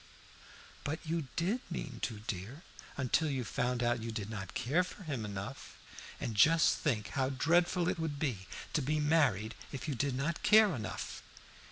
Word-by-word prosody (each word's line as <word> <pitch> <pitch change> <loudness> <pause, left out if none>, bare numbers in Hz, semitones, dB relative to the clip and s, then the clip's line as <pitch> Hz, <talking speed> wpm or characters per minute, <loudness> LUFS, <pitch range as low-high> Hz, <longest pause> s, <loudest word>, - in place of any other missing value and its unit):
"But 155 +3 -1
you 160 -2 -1
did 190 +9 +1
mean 140 -8 -5
to, 110 -3 -3
dear, 110 - -5 0.3
until 140 +4 +2
you 135 -3 -1
found 125 +3 -1
out 120 0 +1
you 115 0 -4
did 110 -1 -4
not 100 -4 -6
care 150 +9 +2
for 185 +2 -9
him 140 -9 -3
enough. 100 -2 -6 0.4
And 115 - -3
just 160 +11 +5
think 115 -9 0
how 130 -1 0
dreadful 170 +6 +2
it 180 -1 0
would 160 -3 -2
be 120 -11 -2 0.3
to 155 - +2
be 150 +3 0
married 140 -9 +3 0.2
if 140 - -5
you 150 - 0
did 135 +1 0
not 150 +6 -1
care 215 -2 +6
enough!" 110 -5 -5
140 Hz, 175 wpm, -33 LUFS, 115-160 Hz, 0.4 s, care